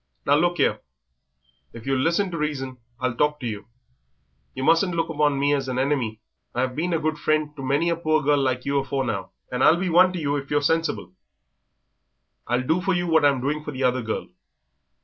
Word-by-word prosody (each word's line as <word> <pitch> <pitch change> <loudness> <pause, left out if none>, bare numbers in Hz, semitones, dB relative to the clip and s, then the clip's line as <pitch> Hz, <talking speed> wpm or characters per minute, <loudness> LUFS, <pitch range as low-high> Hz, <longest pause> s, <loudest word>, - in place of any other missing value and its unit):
"Now 140 - +3
look 175 +3 +1
'ere, - - +2 0.9
if 115 -1 -10
you'll 135 -1 +1
listen 175 +5 +1
to 170 - -4
reason 135 -4 -3 0.2
I'll 130 -1 0
talk 150 +4 +1
to - - -5
you. 105 -3 -5 0.9
Yer 130 - -4
mustn't 170 +4 +3
look 165 0 0
upon 150 -3 +1
me 140 +1 +2
as 140 -2 -1
a 130 - -2
henemy. 130 -5 0 0.4
I've 125 +1 -1
been 170 +4 -1
a 165 - +2
good 155 0 -2
friend 155 -1 0
to 140 - -8
many 140 +5 +1
a 170 - +1
poor 155 -2 +1
girl 145 0 +3
like 130 -1 -1
you 140 0 +1
afore 135 0 -2
now, - - -3 0.2
and 125 +1 0
I'll 165 - +6
be 185 +1 -1
one 180 +2 +5
to 180 - -3
you 145 -2 0
if 140 -1 -6
you're 145 0 +1
sensible. 160 - 0 1.3
I'll 125 +1 +1
do 160 +7 +1
for 190 0 +1
you 175 0 0
what 160 -3 +3
I'm 140 -3 +3
doing 150 +3 -2
for - - -6
the 135 -2 -4
other 125 0 +2
girl. 110 -6 -4
145 Hz, 215 wpm, -24 LUFS, 130-160 Hz, 1.3 s, I'll